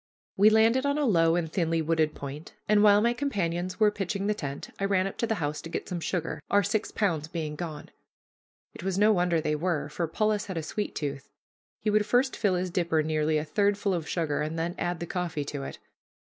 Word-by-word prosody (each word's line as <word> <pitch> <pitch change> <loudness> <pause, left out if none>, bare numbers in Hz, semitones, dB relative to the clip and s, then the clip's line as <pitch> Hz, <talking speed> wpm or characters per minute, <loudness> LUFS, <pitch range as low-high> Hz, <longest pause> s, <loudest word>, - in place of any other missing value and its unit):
We 205 +2 +6
landed 225 +4 +4
on 285 +1 +1
a 300 - +1
low 165 -7 +4
and 160 -2 -2
thinly 165 -2 +1
wooded 160 -1 +1
point, 140 +3 -8
and 210 0 +4
while 205 0 +6
my 235 +1 +3
companions 185 -9 -2
were 215 -1 +5
pitching 195 -1 -3
the 210 - +2
tent, 140 -8 -6
I 195 - 0
ran 195 -1 +2
up 195 - -4
to 230 - +1
the 220 - 0
house 150 -4 -3
to 165 - -8
get - - -4
some 180 - -3
sugar, 170 0 -2
our 205 0 +4
six 205 +3 -1
pounds 165 -8 0
being 160 -2 -4
gone. 155 -3 -6 0.8
It - - -10
was 190 0 -1
no 210 +2 +5
wonder 175 -3 +2
they 150 -1 0
were, 165 -1 -1
for 165 +2 -2
Polis 210 +4 0
had 190 -3 -4
a 160 - -2
sweet 205 +7 -4
tooth. 140 -3 -4 0.5
He 210 - +1
would 210 0 +2
first 250 +4 +2
fill 200 -4 +1
his 180 0 -2
dipper 170 -3 +1
nearly 155 0 +1
a 150 - -2
third 205 +4 +1
full 200 -1 0
of 165 -4 -3
sugar, 160 -5 -1
and 155 +2 -3
then 170 +2 -1
add 175 -1 -2
the - - -2
coffee 170 -5 -3
to 145 0 -5
it. 135 - -6
175 Hz, 230 wpm, -28 LUFS, 160-205 Hz, 0.8 s, We